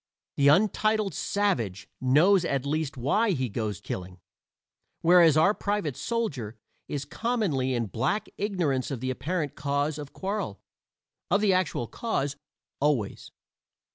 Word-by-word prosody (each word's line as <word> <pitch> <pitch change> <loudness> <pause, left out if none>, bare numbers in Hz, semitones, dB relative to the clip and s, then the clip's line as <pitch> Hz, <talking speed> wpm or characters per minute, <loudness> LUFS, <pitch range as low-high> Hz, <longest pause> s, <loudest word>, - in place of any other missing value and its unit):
The 140 - +3
untitled 210 +4 +3
savage 120 - -1
knows 165 +9 +5
at 140 -5 -1
least 150 -1 -2
why 195 - +2
he 130 -5 -1
goes 105 -2 -3
killing, 90 0 -6 0.8
whereas 170 -2 +6
our 195 +6 +5
private 205 -10 -2
soldier 140 - -3 0.3
is 145 -1 -3
commonly 155 - -1
in 120 -1 0
black 135 - -1
ignorance 175 -11 -1
of 135 -4 -3
the 130 +1 -2
apparent 150 +3 -2
cause 145 +2 -1
of 145 -2 -7
quarrel 190 - -3 0.7
of 200 - +3
the 205 -3 +4
actual 185 -9 0
cause, 140 - -2 0.4
always. 135 -8 0
150 Hz, 130 wpm, -27 LUFS, 130-195 Hz, 0.8 s, whereas